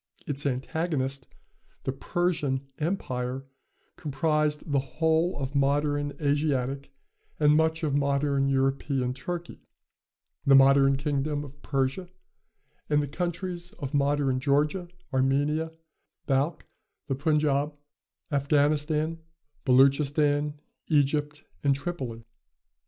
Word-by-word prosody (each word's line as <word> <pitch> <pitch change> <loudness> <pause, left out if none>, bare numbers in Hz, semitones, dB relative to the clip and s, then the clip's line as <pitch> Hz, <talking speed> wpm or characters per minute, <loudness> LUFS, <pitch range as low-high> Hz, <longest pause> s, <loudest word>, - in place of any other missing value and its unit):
Its 145 0 -2
antagonist, 135 0 -2 0.6
the - - -1
Persian, 145 -2 -1 0.2
empire, 135 -6 -2 0.5
comprised 150 +1 0
the 140 - +3
whole 160 +5 +1
of 135 -1 -4
modern 145 +1 +1
Asiatic 140 -2 0 0.5
and 150 -1 +5
much 160 +1 +2
of 150 -3 0
modern 140 -1 +1
European 135 -1 0
Turkey, 175 +4 -6 0.8
the 140 -2 +6
modern 135 0 +6
kingdom 145 +1 -1
of 145 0 -12
Persia 135 +6 -1 0.8
and 150 -1 +3
the - - -3
countries 175 +3 -4
of 135 -2 -6
modern 140 -2 +2
Georgia, 150 +6 +1 0.3
Armenia, 145 +5 +1 0.5
Balkh, 140 +4 0 0.4
the 135 - -1
Punjaub, 150 0 +1 0.6
Afghanistan, 150 +3 +1 0.5
Beloochistan, 145 +3 +3 0.3
Egypt 150 0 +1 0.2
and 140 -1 +3
Tripoli. 135 -7 -5
145 Hz, 95 wpm, -27 LUFS, 135-155 Hz, 0.8 s, the